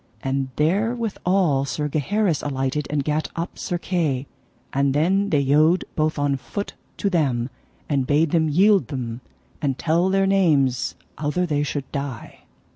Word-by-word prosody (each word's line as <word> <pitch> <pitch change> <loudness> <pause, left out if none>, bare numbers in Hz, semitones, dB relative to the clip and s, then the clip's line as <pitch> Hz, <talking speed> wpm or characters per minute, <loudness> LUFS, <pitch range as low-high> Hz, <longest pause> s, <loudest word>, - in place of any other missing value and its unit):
And 135 0 -1
therewithal 190 - +1
Sir 150 +2 -2
Gaheris 165 +4 0
alighted, 135 +1 -2
and 145 -1 0
gat 150 +2 0
up 170 +1 -4
Sir 175 - -2
Kay. 160 -7 -1 0.5
And 140 0 +2
then 190 +7 +2
they 145 -5 +3
yode 155 +6 +3
both 155 0 0
on 145 -1 +1
foot 200 +9 -5 0.2
to - - -1
them, 135 -9 +1 0.4
and 135 -4 0
bade 150 +1 +3
them 160 -2 +2
yield 195 +6 +4
them, 125 -3 -5 0.4
and 135 -4 0
tell 170 +3 +2
their 195 0 +3
names 155 -10 +2 0.2
outher 155 +5 0
they 150 -4 0
should 145 -1 -2
die. 140 -5 -6
150 Hz, 150 wpm, -23 LUFS, 140-180 Hz, 0.5 s, yield